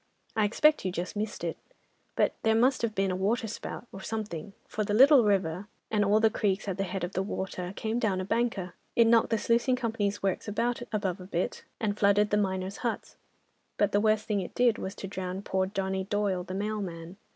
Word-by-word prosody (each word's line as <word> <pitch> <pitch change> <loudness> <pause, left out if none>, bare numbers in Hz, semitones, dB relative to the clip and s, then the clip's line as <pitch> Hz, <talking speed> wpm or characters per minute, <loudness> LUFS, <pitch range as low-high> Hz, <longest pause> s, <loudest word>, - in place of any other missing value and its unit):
I 215 -1 +3
expect 300 +9 +3
you 185 - -1
just 180 +3 -4
missed 210 +1 -3
it, - - -2 0.6
but - - +2
there 220 0 +3
must 255 +4 +3
have 225 -2 -1
been 195 -1 +1
a - - -1
waterspout 220 +5 -2
or 195 - -9
something, 210 -3 -5
for 215 - -2
the 205 0 0
Little 270 +2 +8
River, 190 -2 +1 0.2
and 210 -2 +3
all 205 +2 +4
the 220 0 +4
creeks 200 -1 0
at 195 -1 -3
the 195 - +1
head 190 -1 -4
of 175 - -2
the 190 - 0
water, 190 -2 -4
came 220 +3 -1
down 205 -6 +1
a 185 - -3
banker. 220 -5 -1 0.2
It 235 - +6
knocked 230 0 +4
the 225 - +2
sluicing 235 +4 +2
company's 220 -5 -2
works 195 +1 -1
about, 235 +4 -1
above 195 -4 -1
a 180 - -9
bit, 180 -2 -2
and 210 -2 0
flooded 205 +1 +4
the 210 - +3
miners' 190 -1 -1
huts—but 225 -3 -4
the 205 - +3
worst 215 0 +2
thing 210 -2 0
it 185 - -6
did 240 -3 +3
was 190 +1 -5
to 195 - -6
drown 190 0 -4
poor 190 -1 0
Johnny 190 -1 -2
Doyle 195 -2 0
the 185 +1 -6
mailman. 190 -4 -4
205 Hz, 210 wpm, -29 LUFS, 190-220 Hz, 0.6 s, Little